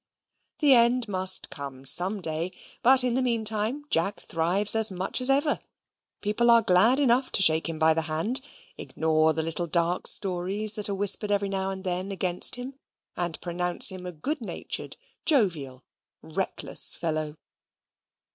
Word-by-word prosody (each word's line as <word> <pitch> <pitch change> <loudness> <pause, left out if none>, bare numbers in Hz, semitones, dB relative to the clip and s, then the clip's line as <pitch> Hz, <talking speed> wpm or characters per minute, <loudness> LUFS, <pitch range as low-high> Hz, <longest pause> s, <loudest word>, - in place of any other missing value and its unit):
The 290 -3 +3
end 240 0 +2
must 185 -1 +1
come 135 -2 -10
some 185 +9 +4
day, 165 +2 -5 0.3
but 260 +1 +5
in 250 -1 -1
the 260 - 0
meantime 225 +2 -2
Jack 175 +5 -1
thrives 185 +6 0
as 220 -1 +3
much 190 +6 -3
as 255 - +3
ever; 285 +2 +1 0.6
people 225 +3 -1
are 235 -1 +4
glad 220 +7 +3
enough 255 -1 0
to 195 - +4
shake 160 -1 +3
him 165 - -6
by 160 0 +2
the 165 - -1
hand, 210 - 0 0.4
ignore 160 0 -1
the 160 +1 -3
little 165 +2 -5
dark 170 +2 -1
stories 195 +3 +3
that 210 -1 +2
are 200 - -3
whispered 205 +1 +3
every 200 -1 -1
now 190 0 -3
and 190 -1 -8
then 185 +1 -4
against 185 +1 +1
him, 260 +2 -10 0.4
and 175 -2 -4
pronounce 175 0 +2
him 185 -1 -9
a - - -6
good 265 - -6
natured, 220 - -4 0.3
jovial, 165 - -1 0.4
reckless - - +1
fellow. 155 -2 -4
190 Hz, 160 wpm, -25 LUFS, 170-230 Hz, 0.6 s, but